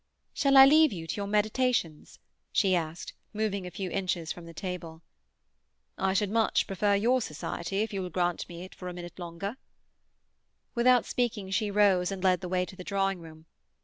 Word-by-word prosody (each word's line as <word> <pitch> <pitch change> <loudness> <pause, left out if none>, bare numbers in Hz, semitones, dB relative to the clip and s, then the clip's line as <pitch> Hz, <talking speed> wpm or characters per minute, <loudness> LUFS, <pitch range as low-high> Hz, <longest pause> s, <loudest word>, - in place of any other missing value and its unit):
"Shall 275 -1 +3
I 270 - +11
leave 310 +1 +6
you 170 -5 -6
to 165 - -4
your 200 -1 -3
meditations?" 210 -5 0 0.3
she 195 -3 +3
asked, 165 0 -4 0.2
moving 205 -3 -2
a - - -5
few 180 +1 -5
inches 180 -4 -2
from 175 -1 -8
the - - -9
table. 170 -2 -6 0.9
"I 190 0 0
should 200 0 +1
much 225 0 +2
prefer 200 +1 +1
your 240 +5 +2
society, 170 +3 -3
if 220 - -5
you 195 - -2
will 180 - -4
grant 175 0 0
it - - -8
me 175 +1 -8
for 180 - -8
a 180 - -5
little 175 0 -8
longer." 195 +7 -5 1.2
Without 245 0 +4
speaking, 220 -6 -2
she 210 +2 0
rose 195 -3 +3
and 195 -1 -5
led 185 -1 +3
the 180 - -5
way 180 0 +1
to 190 - -12
the 185 - -9
drawing 195 -1 0
room. 160 -1 -13
190 Hz, 190 wpm, -29 LUFS, 175-210 Hz, 1.2 s, I